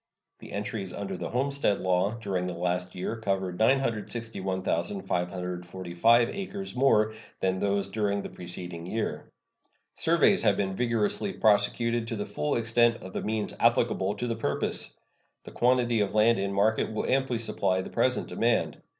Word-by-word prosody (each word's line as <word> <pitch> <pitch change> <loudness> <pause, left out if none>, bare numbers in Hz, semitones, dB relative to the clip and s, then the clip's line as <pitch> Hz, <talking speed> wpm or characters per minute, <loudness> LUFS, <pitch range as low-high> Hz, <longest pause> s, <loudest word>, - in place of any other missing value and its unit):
The - - -11
entries 105 -3 -4
under 95 -1 -4
the - - -5
homestead 135 -4 +1
law 95 +4 +1
during 95 -5 -2
the 90 -2 -4
last 90 +1 -2
year 95 +5 -3
covered 95 -4 -2
961,545 95 -3 0
acres 195 -2 -5
more 110 -5 +3 0.3
than 95 0 0
those 100 0 0
during 100 -2 -1
the - - -6
preceding 90 -1 -7
year. 110 +3 -3 0.6
Surveys 170 +5 +3
have 105 -3 +3
been 95 -1 -1
vigorously 115 - 0
prosecuted 115 - +2
to 115 - -3
the 105 -1 -3
full 140 +8 -2
extent 115 0 +2
of 95 - -9
the - - -2
means 110 -1 -2
applicable 95 +2 +2
to 120 - -3
the 115 -1 -1
purpose. 75 -10 -2 0.5
The - - -10
quantity 120 -2 +2
of 100 -1 0
land 110 +1 +4
in 100 0 -1
market 105 +3 +1
will 110 - -2
amply 130 -2 +1
supply 95 -4 0
the - - -8
present - - +1
demand. - - 0
105 Hz, 150 wpm, -28 LUFS, 95-115 Hz, 0.6 s, land